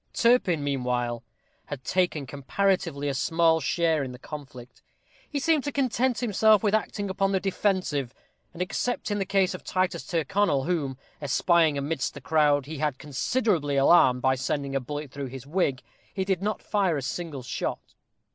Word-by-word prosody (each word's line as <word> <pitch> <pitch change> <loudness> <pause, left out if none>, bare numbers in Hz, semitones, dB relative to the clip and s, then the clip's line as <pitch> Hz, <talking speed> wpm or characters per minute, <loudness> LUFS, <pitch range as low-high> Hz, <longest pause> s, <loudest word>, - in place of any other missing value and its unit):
Turpin, 230 - +3
meanwhile, 125 -4 -1 0.5
had 140 -3 -6
taken 175 -6 0
comparatively 145 +2 -1
a 140 - 0
small 165 +4 +2
share 160 -2 +1
in 130 -2 -6
the - - -9
conflict. 130 -4 -10 0.5
He 295 - -3
seemed 300 0 +2
to 290 - -1
content 255 -3 0
himself 220 -2 +4
with 210 -1 +2
acting 210 -1 -1
upon 195 +1 0
the 190 - +2
defensive, 185 - 0 0.4
and 175 +1 -2
except 215 +4 -2
in 205 - 0
the 195 - -2
case 195 -1 +2
of 185 - -8
Titus 185 0 -1
Tyrconnel, 170 -3 +1
whom, 145 -6 -1 0.2
espying 155 +2 +3
amidst 140 0 -2
the - - -7
crowd, 150 -3 +2
he 155 0 -7
had 150 -3 0
considerably 150 - 0
alarmed 135 -3 +5
by 130 - +4
sending 135 +1 -2
a - - +2
bullet 145 +2 -6
through 140 -1 -5
his 130 0 -9
wig, 145 -5 0 0.3
he 190 -1 -2
did 190 -2 0
not 210 +1 -2
fire 195 -7 +1
a 140 - -4
single 150 -2 -4
shot. 125 - -4
160 Hz, 170 wpm, -26 LUFS, 140-195 Hz, 0.5 s, alarmed